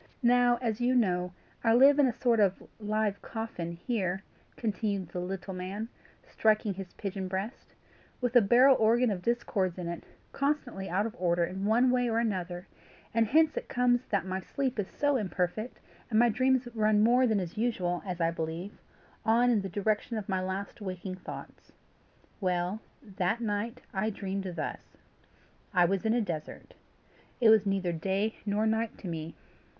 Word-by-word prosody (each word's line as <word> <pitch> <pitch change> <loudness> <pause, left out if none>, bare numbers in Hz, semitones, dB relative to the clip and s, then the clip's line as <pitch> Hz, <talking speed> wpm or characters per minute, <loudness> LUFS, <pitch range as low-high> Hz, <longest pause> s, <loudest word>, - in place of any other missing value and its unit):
Now, 245 0 +4
as 225 -1 -1
you 250 +1 +2
know, 180 -6 +1 0.3
I 225 -1 +4
live 275 +4 +7
in 280 - +6
a - - +1
sort 235 -3 +3
of 195 -2 +2 0.2
live 210 -1 -1
coffin 220 -7 -5
here," 190 0 -2 0.3
continued 200 -5 -2
the 180 - -5
little 190 +2 -4
man, 190 +5 -5 0.4
striking 215 -2 +1
his 190 -1 -8
pigeon 195 -2 -4
breast, 195 +6 -5 0.4
"with 245 -1 -1
a 245 - +9
barrel 250 +6 +6
organ 230 +2 +4
of 185 -3 -3
discords 195 -5 0
in 180 -2 -4
it, 170 0 -5 0.3
constantly 275 -9 -2
out 195 +4 +1
of 225 - -5
order 175 -1 +2
in 190 +3 -3
one 240 +4 +4
way 245 -1 +2
or 225 - 0
another; 185 -6 -2 0.5
and 225 0 +3
hence 315 +5 +4
it - - -4
comes 245 0 +2
that 200 -4 0
my 190 0 -2
sleep 260 +5 -3
is 200 - -1
so 290 -1 +1
imperfect, 200 +2 -2 0.3
and 220 - +1
my 240 +1 +6
dreams 255 +2 +2
run 215 -2 +3
more 250 +3 +5
than 220 -3 +2
is 175 -3 -5
usual, 190 -6 -1
as 180 -3 -5
I 165 0 +2
believe, 165 +4 -5 0.4
on 235 +3 +4
in 220 -4 +2
the 195 - -5
direction 210 +4 -1
of 210 - -5
my 190 -2 0
last 190 +3 -4
waking 185 -1 -5
thoughts. - - -10 0.7
Well, 180 +2 -1 0.4
that 185 +5 +1
night, 230 +2 -2
I 205 +2 0
dreamed 195 -1 -4
thus: - - -6 0.8
I 180 -1 +6
was 195 +4 0
in 220 - +3
a 240 - +2
desert. 165 -7 -6 0.7
It 230 -3 +6
was 215 -2 +5
neither 195 -3 0
day 195 +6 -1
nor 205 +2 +1
night 220 0 0
to 195 - -8
me. 165 -1 -5
210 Hz, 175 wpm, -30 LUFS, 185-235 Hz, 0.8 s, a